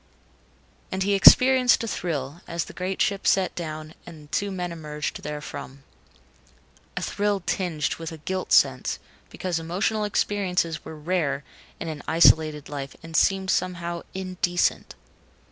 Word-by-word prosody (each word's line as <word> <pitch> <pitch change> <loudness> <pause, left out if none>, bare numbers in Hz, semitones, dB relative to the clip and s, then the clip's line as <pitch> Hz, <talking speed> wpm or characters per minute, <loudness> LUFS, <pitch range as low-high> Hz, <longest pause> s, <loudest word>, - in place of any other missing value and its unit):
And 190 0 -1
he 200 +1 +1
experienced 250 +5 +7
a - - -3
thrill 155 -6 -3
as 170 -1 -2
the - - -11
great 185 +1 -1
ship 200 -1 -1
set 190 -1 +3
down 155 -2 -6
and 155 -3 -13
two 205 - 0
men 180 -2 -4
emerged 150 -2 -4
therefrom. 145 -2 -7 1.1
A - - -1
thrill 205 -1 0
tinged 165 -6 -1
with 165 -1 -6
a 160 - -8
guilt 185 +4 -4
sense, - - +3 0.3
because 180 -3 -3
emotional 190 +6 -1
experiences 185 -6 0
were 160 - -8
rare 150 -3 -1 0.4
in - - -5
an 155 -2 -5
isolated 155 -2 +4
life 140 -2 -6
and 165 0 -8
seemed 190 +1 +3
somehow 170 -2 -1
indecent. 185 -2 -1
170 Hz, 140 wpm, -25 LUFS, 155-190 Hz, 1.1 s, experienced